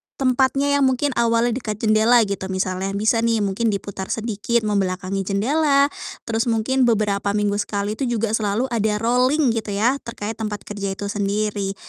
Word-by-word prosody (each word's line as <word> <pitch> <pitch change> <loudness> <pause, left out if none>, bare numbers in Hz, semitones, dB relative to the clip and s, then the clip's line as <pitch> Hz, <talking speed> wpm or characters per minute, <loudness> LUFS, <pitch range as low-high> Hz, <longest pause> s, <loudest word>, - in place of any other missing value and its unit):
tempatnya 270 +2 +1
yang 270 - +4
mungkin 265 +2 0
awalnya 230 +1 +2
dekat 220 -3 -3
jendela 220 +2 +5
gitu. 195 -2 -3
Misalnya 185 0 -2
bisa 220 +3 +2
nih 230 -2 +1
mungkin 200 +4 -1
diputar 200 -2 -3
sedikit 225 +1 -1
membelakangi 195 -2 -1
jendela, 280 +7 +2 0.3
terus 230 +1 -1
mungkin 245 +3 +2
beberapa 205 -2 +1
minggu 205 0 0
sekali 205 +1 -3
itu 265 - 0
juga 220 0 -1
selalu 215 +1 0
ada 215 -2 +1
rolling 250 +5 +2
gitu 215 -3 -3
ya, 245 +7 +2
terkait 225 -1 -5
tempat 210 -2 -4
kerja 200 -2 -4
itu 200 0 -4
sendiri. 205 -1 -1
215 Hz, 160 wpm, -21 LUFS, 200-240 Hz, 0.3 s, jendela